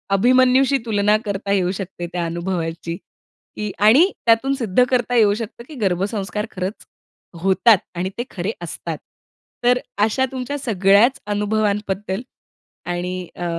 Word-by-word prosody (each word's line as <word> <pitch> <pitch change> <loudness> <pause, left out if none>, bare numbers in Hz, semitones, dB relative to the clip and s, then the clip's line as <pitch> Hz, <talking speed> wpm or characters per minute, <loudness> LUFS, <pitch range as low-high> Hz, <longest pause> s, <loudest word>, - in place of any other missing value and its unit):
अभिमन्यूशी 255 +5 +4
तुलना 210 -1 +2
करता 200 -1 -3
येऊ 185 -2 +2
शकते 185 -2 -6
त्या 175 -1 -1
अनुभवाची 170 -1 -3
की 210 +3 -10
आणि 255 - +6
त्यातून 235 +4 +3
सिद्ध 235 -2 +2
करता 245 -1 +1
येऊ 215 -3 +5
शकतं 230 +1 -7
की 310 - -10
गर्भसंस्कार 200 +2 -1
खरंच 185 +3 -5 0.6
होतात 195 +4 +5 0.2
आणि 180 +2 -2
ते 240 - -1
खरे 185 +2 -3
असतात. 165 -1 -5 0.7
तर 250 +1 +4 0.2
अशा 225 +5 +2
तुमच्या 265 +2 -4
सगळ्याच 215 +3 +3
अनुभवांबद्दल 205 -1 -1 0.6
आणि 180 +1 -3
अ, 175 - -5
205 Hz, 130 wpm, -21 LUFS, 185-235 Hz, 0.7 s, आणि